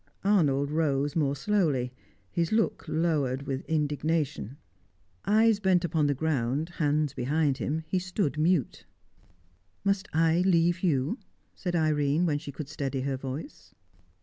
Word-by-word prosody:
Arnold 145 -8 +2
rose 145 -2 0
more 145 -4 +1
slowly, 145 -8 0 0.4
his 170 -1 0
look 220 0 +1
lowered 150 -5 0
with 135 -1 -3
indignation. 150 -4 -1 0.7
Eyes 215 +1 +4
bent 190 -3 +2
on 150 -2 +3
the 145 - +1
ground, 145 +1 -1
hands 150 -4 0
behind 140 +1 0
him, 160 +3 -2
he 185 - 0
stood 180 -3 -1
mute. 160 -4 +1 1.0
"Must 195 -1 0
I 165 +1 +3
leave 175 -1 +3
you?" 155 - 0 0.3
said 175 -2 -3
Irene, 155 0 +2
when 150 -4 +1
she 145 -1 -8
could 145 0 -7
steady 140 -2 -3
her 135 0 -1
voice. 130 - -7
155 Hz, 135 wpm, -28 LUFS, 140-175 Hz, 1.0 s, Eyes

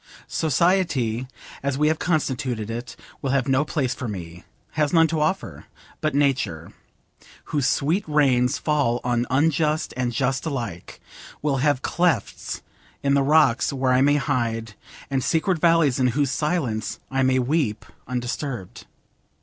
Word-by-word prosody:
Society, 145 - +1 0.3
as 140 -1 -1
we 150 +1 +3
have 155 0 +1
constituted 130 -9 -1
it, 120 +1 -6 0.3
will 135 - -2
have 135 -1 +1
no 135 +1 +3
place 140 -4 -1
for 125 - -5
me, 90 -4 -7 0.3
has 150 -2 0
none 165 -2 +5
to 160 0 -1
offer; 190 +6 -2 0.4
but 155 -2 0
Nature, 130 - 0 0.7
whose 145 -4 -1
sweet 165 +9 +1
rains 135 -5 +3
fall 140 -6 +1
on 120 0 0
unjust 155 +2 +1
and 125 -1 -1
just 130 +2 0
alike, 115 - -5 0.4
will 145 -2 +1
have 140 0 +1
clefts 170 - -1 0.4
in 140 0 +2
the 140 - +4
rocks 135 -3 +3
where 130 -2 +1
I 130 - +4
may 145 +1 +4
hide, 115 -6 -1 0.4
and 135 -2 0
secret 165 +1 +1
valleys 165 -6 +3
in 130 - +3
whose 135 +2 +1
silence 135 -8 -1
I 135 0 +1
may 130 0 +3
weep 130 -4 0 0.2
undisturbed. 125 -3 -4
135 Hz, 145 wpm, -23 LUFS, 125-150 Hz, 0.7 s, none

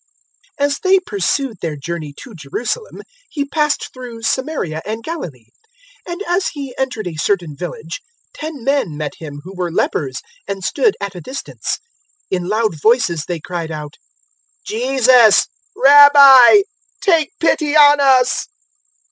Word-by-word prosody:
'" - - -36
017:011 285 - +3
As 285 0 -2
they 380 0 +3
pursued 215 - -2
their 160 -3 -3
journey 150 +1 -6
to 240 - -12
Jerusalem, 235 - -5 0.3
He 285 -2 -3
passed 300 +1 -1
through 245 -3 -10
Samaria 225 - -2
and 220 +2 -5
Galilee. 170 - -7 0.6
017:012 - - -6
And 355 +4 -5
as 355 +2 0
He 275 -4 -7
entered 255 -5 -3
a 170 -3 -6
certain 175 -7 -1
village, 165 0 -7 0.3
ten 305 -5 -7
men 270 - -1
met 150 -1 -4
Him 145 -3 -9
who 185 +3 -10
were 180 -2 -3
lepers 135 -5 -2 0.2
and 195 -1 -5
stood 435 - +1
at 200 -1 -5
a 180 - -9
distance. 260 - -5 0.6
017:013 - - +2
In 175 - -6
loud 215 -7 -1
voices 220 - +2
they 175 -2 -3
cried 170 0 -5
out, 150 -1 -8 0.7
"Jesus, 250 -1 +4 0.3
Rabbi, 285 +3 +8 0.4
take 330 -8 +1
pity 310 -2 +1
on 290 -1 +6
us." 260 -2 +3
230 Hz, 150 wpm, -17 LUFS, 170-285 Hz, 0.7 s, Rabbi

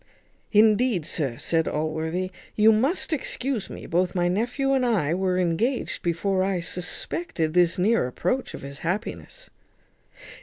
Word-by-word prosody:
"Indeed, 215 -3 +4
sir," 135 -8 -1
said 165 +3 0
Allworthy, 160 +4 -2 0.2
"you 220 +1 +6
must 270 - +1
excuse 260 -6 -2
me; - - -8
both 180 +2 0
my 175 -1 +2
nephew 245 +9 0
and 265 -1 +2
I 195 -11 +1
were 185 0 0
engaged 185 +9 0
before 185 +3 0
I 190 -1 0
suspected 175 - -2
this 175 -1 +3
near 205 - +2
approach 185 - -2
of - - -10
his 140 0 -7
happiness." 210 - -4
185 Hz, 140 wpm, -25 LUFS, 170-235 Hz, 0.2 s, you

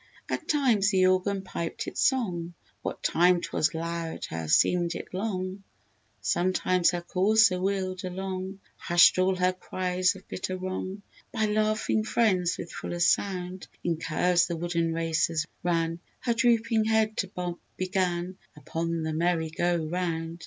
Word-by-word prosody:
At - - -3
times 240 -9 +3
the 190 -2 +3
organ 185 +1 +1
piped 170 -3 -4
its - - -3
song, 175 -10 0 0.3
What - - -5
time 180 +1 +4
'twas 160 -1 -1
loud, 165 0 -4
her 80 0 -4
seemed 175 - +3
it - - -7
long; 190 -1 -3 0.6
Sometimes 185 0 +2
her 175 -1 -2
courser 195 +1 +3
wheeled 190 -1 -1
along, 190 +1 -5 0.2
Hushed 175 +1 +5
all 185 +1 +3
her 185 0 +2
cries 185 0 0
of 190 - -14
bitter 185 0 -4
wrong: 185 +1 -5 0.3
By 220 -2 0
laughing 215 +1 +1
friends, 190 -6 +1
with 170 - -7
fuller 175 - -5
sound, 180 +1 0 0.2
In 170 -2 0
curves 170 +2 +2
the 170 - -2
wooden 170 0 -1
racers 165 -1 0 0.2
ran; 165 -1 0 0.2
Her 240 - +1
drooping 230 -2 +2
head 220 -1 +2
to 195 - 0
bob 180 -2 -5 0.2
began 185 -1 -1 0.2
Upon 165 +2 -3
the 160 0 -2
Merry 165 0 0
go 175 0 0
round. 165 0 -3
180 Hz, 145 wpm, -27 LUFS, 170-195 Hz, 0.6 s, Hushed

